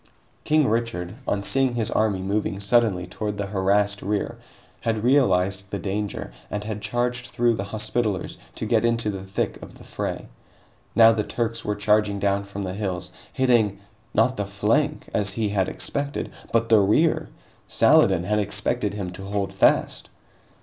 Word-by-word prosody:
King 155 -2 +3
Richard, 105 -6 -1
on 100 0 0
seeing 130 +2 +1
his 115 -1 -1
army 100 -4 +1
moving 100 0 -1
suddenly 100 -3 +2
toward 105 +3 -4
the 100 - -2
harassed 100 +1 +1
rear, 105 +1 -2 0.4
had 110 -2 -1
realized 95 -7 +2
the 100 - -3
danger 100 -4 -4 0.2
and 105 0 -3
had 105 -1 -5
charged 120 +3 -1
through 120 -1 +1
the 100 -3 -3
Hospitallers 105 -2 -1 0.2
to - - -4
get 110 0 +2
into 115 -2 +1
the 95 -1 -6
thick 95 0 -3
of - - -11
the - - -14
fray. - - -4 0.7
Now 115 -1 +8
the 110 -1 0
Turks 115 +1 -2
were 105 - -1
charging 105 0 +2
down 100 0 0
from 100 0 -6
the 95 -1 -4
hills, 95 -3 -3 0.2
hitting 120 -6 +2 0.3
not 125 +4 +2
the 100 - -1
flank 100 0 0
as 100 -2 0
he 110 -1 -1
had 95 -2 0
expected, 140 0 -3 0.2
but 115 0 +1
the 110 -2 +7
rear! 110 +12 +2 0.4
Saladin 90 -3 +4
had 105 +3 0
expected 100 0 -1
him 95 -4 -4
to 95 +2 -9
hold 100 -1 -2
fast! 95 - +2
105 Hz, 165 wpm, -24 LUFS, 100-115 Hz, 0.7 s, Now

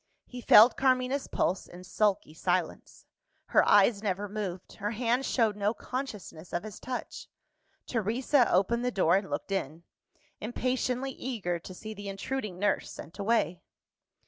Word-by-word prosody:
He 250 -1 -9
felt 225 +1 +7
Carmina's 260 +1 +1
pulse, 185 - -1
in 180 +1 -12
sulky 195 -3 0
silence. 175 +1 -2 0.4
Her - - +5
eyes 205 +1 +5
never 205 -1 -2
moved; 195 -3 -5
her 210 -1 -2
hand 240 +3 0
showed 225 -4 +2
no 210 +2 0
consciousness 210 - -6
of 175 - -1
his 215 -3 -8
touch. 255 -1 -6 0.6
Teresa 240 +3 +1
opened 230 +6 +2
the 250 - +1
door, 185 -7 +3
and 195 -1 -4
looked - - -4
in 165 -4 -3 0.6
impatiently 255 +3 -1
eager 210 -10 -3
to 185 - -10
see 220 +3 -7
the 205 -1 -7
intruding 200 0 -4
nurse 205 +2 0
sent 165 - -11
away. 200 -5 +1
210 Hz, 145 wpm, -29 LUFS, 185-245 Hz, 0.6 s, felt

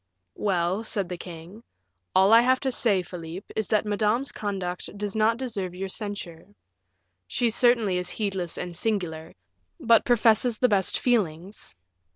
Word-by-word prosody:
"Well," 185 +1 0
said 200 -5 -2
the 180 - -4
king, 175 +5 -10 0.5
"all 190 +3 +6
I 230 - +9
have 255 +1 +3
to 265 - 0
say, 205 -7 +1
Philip, 175 +1 -8
is 220 - -1
that 215 0 +1
Madame's 215 +5 0
conduct 190 -2 -4
does 205 -1 -3
not 220 +1 +3
deserve 205 -8 -4
your 190 +1 -4
censure. 200 -2 -6 0.7
She 235 - 0
certainly 230 -6 +3
is 180 0 -5
heedless 190 -5 -3
and 175 -1 -4
singular, 170 -6 -2 0.4
but 230 -6 +4
professes 230 0 +3
the 250 - +3
best 195 -3 +2
feelings. 190 - -1
205 Hz, 150 wpm, -26 LUFS, 180-225 Hz, 0.7 s, I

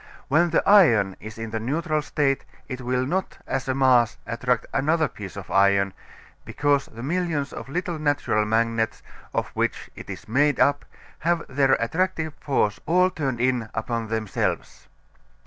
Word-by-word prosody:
When 165 +5 +4
the 165 - +1
iron 115 - +5
is 110 +1 -9
in 115 -1 -5
the 110 - -2
neutral 155 +6 -1
state 140 -2 0 0.2
it 130 -1 -6
will 125 +1 0
not 185 +7 -2
as 135 -1 -3
a 130 - 0
mass 125 -4 +4
attract 125 +3 -1
another 155 +2 +2
piece 100 -3 -9
of 100 -2 -8
iron, 100 0 +3 0.5
because 145 -1 +1
the 115 +1 -10
millions 160 -2 -1
of - - -8
little 175 +1 -3
natural 145 -8 +1
magnets 115 0 0 0.3
of - - -2
which - - -2
it - - -11
is - - -8
made 145 +5 +2
up 140 +2 +3 0.3
have 170 0 0
their 135 0 +2
attractive 160 +5 0
force 110 -8 0
all 180 +3 +4
turned 135 -8 -2
in 125 -3 0
upon 115 0 -2
themselves. 110 -2 -3
130 Hz, 160 wpm, -24 LUFS, 115-155 Hz, 0.5 s, iron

